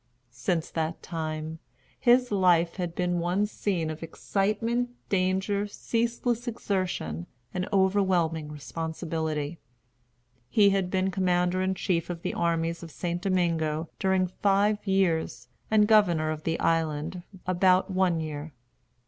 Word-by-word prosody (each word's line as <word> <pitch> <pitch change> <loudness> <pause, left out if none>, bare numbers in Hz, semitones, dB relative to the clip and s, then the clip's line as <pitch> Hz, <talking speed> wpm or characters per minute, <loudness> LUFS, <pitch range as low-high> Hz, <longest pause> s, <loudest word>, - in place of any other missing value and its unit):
Since 155 +8 -1
that 160 0 -2
time, 160 -1 -4 0.4
his 245 -1 +4
life 175 -4 +3
had 175 -2 -3
been 180 -1 0
one 180 +4 +1
scene 185 -6 -2
of 155 - -8
excitement, 215 +8 -1 0.2
danger, 195 +2 +1
ceaseless 235 +2 -1
exertion, 185 - -2 0.3
and 185 +2 -2
overwhelming 185 -6 +2
responsibility. 160 0 -3 0.9
He 205 -2 +5
had 195 -2 +1
been 190 0 +1
commander 180 0 +1
in 190 0 0
chief 175 -3 -1
of 175 -1 -5
the - - -2
armies 170 0 0
of 170 - -8
St. 175 +2 -3
Domingo 165 -4 0
during 190 -2 +2
five 200 +3 +2
years, 160 -10 +1 0.2
and 210 -1 +4
governor 175 -8 +4
of 155 0 -6
the 165 0 0
island 165 +1 0 0.2
about 185 +1 +3
one 185 -3 +2
year. 155 -1 -5
180 Hz, 125 wpm, -27 LUFS, 160-195 Hz, 0.9 s, He